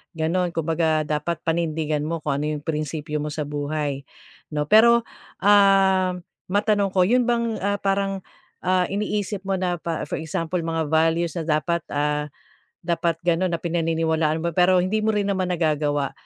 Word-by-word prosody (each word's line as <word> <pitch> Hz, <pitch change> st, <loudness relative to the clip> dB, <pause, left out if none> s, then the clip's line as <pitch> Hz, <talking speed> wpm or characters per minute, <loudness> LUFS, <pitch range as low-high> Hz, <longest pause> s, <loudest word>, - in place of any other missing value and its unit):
gano'n, 170 Hz, +2 st, -1 dB
kumbaga, 160 Hz, -1 st, +1 dB
dapat 150 Hz, +3 st, -3 dB
panindigan 155 Hz, -2 st, -1 dB
mo 165 Hz, -1 st, -4 dB
kung 140 Hz, -1 st, -1 dB
ano 150 Hz, -, -2 dB
'yong 150 Hz, -1 st, -3 dB
prinsipyo 150 Hz, -1 st, -3 dB
mo 150 Hz, -, -3 dB
sa 150 Hz, 0 st, -3 dB
buhay, 145 Hz, -1 st, -3 dB, 0.5 s
'no. 150 Hz, -, +1 dB
Pero, 235 Hz, +2 st, +6 dB, 0.4 s
ah, 195 Hz, -2 st, +4 dB, 0.3 s
matanong 205 Hz, +1 st, +2 dB
ko, 185 Hz, -, +5 dB
'yon 245 Hz, +5 st, +2 dB
bang, 235 Hz, -2 st, 0 dB
ah, 200 Hz, +1 st, 0 dB
parang, 195 Hz, -1 st, -1 dB, 0.4 s
ah, 185 Hz, 0 st, +2 dB
iniisip 205 Hz, -1 st, -2 dB
mo 190 Hz, -1 st, -1 dB
na 180 Hz, -1 st, 0 dB
pa 165 Hz, -1 st, -4 dB
for -, -, -3 dB
example, 165 Hz, +2 st, -3 dB
mga 165 Hz, -2 st, -2 dB
values 165 Hz, +1 st, +1 dB
na 165 Hz, -, -2 dB, 0.2 s
dapat, 170 Hz, 0 st, -2 dB
ah, 150 Hz, 0 st, -1 dB, 0.5 s
dapat 170 Hz, 0 st, 0 dB
gano'n 175 Hz, +1 st, +1 dB
na, 170 Hz, -, -1 dB
pinaniniwalaan 165 Hz, -1 st, 0 dB
mo, 170 Hz, -, 0 dB
pero 180 Hz, 0 st, +4 dB
hindi 215 Hz, +4 st, 0 dB
mo 220 Hz, -, +2 dB
rin 205 Hz, -, +1 dB
naman 190 Hz, -2 st, 0 dB
nagagawa. 150 Hz, -4 st, 0 dB
170 Hz, 160 wpm, -23 LUFS, 155-190 Hz, 0.5 s, Pero